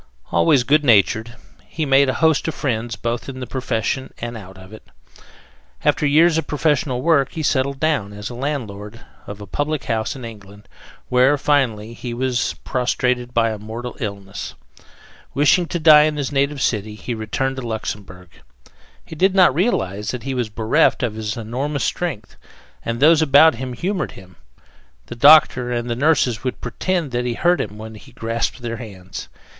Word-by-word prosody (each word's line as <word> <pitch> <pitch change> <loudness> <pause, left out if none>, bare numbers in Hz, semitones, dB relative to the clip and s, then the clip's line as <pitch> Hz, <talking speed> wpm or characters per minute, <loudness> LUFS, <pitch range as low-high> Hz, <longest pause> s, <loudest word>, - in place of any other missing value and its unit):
Always 85 - +3
good 150 +4 +3
natured, 115 -1 +3 0.3
he 160 - -3
made 135 0 +4
a 130 - -1
host 160 -1 +2
of 160 - -3
friends 115 -3 -2
both 120 +3 -4
in 130 -1 -7
the 125 - -4
profession 130 0 -2
and 120 0 -6
out 95 -3 -11
of 95 +2 -14
it. 110 - -11 1.0
After 150 - +2
years 160 +3 +4
of - - -5
professional 145 -4 0
work 145 -5 +2
he 160 - -4
settled 140 -1 0
down 145 -10 0
as 105 +2 -7
landlord 115 -5 -5 0.3
of 100 0 -8
a 105 - -8
public 145 +8 -2
house 110 +4 -2
in 130 -3 -8
England, 100 -2 -12 0.4
where, 130 +3 +4
finally, 120 -7 0
he 120 0 -6
was 125 -1 -1
prostrated 125 -1 -1
by 115 -2 +2
a 110 - -6
mortal 115 +4 -7
illness. 100 -3 -6 0.8
Wishing 150 +5 +3
to 175 - -2
die 155 -2 +7
in 155 -1 -1
his 145 -1 -2
native 140 0 0
city, 105 -1 -1
he 120 +3 -5
returned 125 +5 -2
to - - -4
Luxemberg. 100 -6 -6 0.8
He - - -9
did 190 +4 +2
not 185 -7 +6
realize 105 - -1
that 125 -3 -4
he 135 +1 -3
was 120 -3 -2
bereft 110 +3 +2
of 120 -3 -1
his 110 0 -4
enormous 130 +6 -3
strength, 165 -12 -3 0.5
and 115 0 -3
those 160 +3 +5
about 155 +1 +6
him 125 +1 -6
humored 180 - -3
him: 95 -3 -15 0.7
the 120 - -8
doctor 130 -2 +6
and 120 0 -2
the - - 0
nurses 130 -4 +1
would 130 -1 -3
pretend 175 -7 -2
that 120 0 -1
he 120 -1 -2
hurt 175 +3 +2
them 105 -4 -4
when 110 +1 -9
he 110 - -14
grasped 115 +2 -3
their 115 -1 -4
hands. 95 -5 -9
125 Hz, 175 wpm, -20 LUFS, 110-145 Hz, 1.0 s, die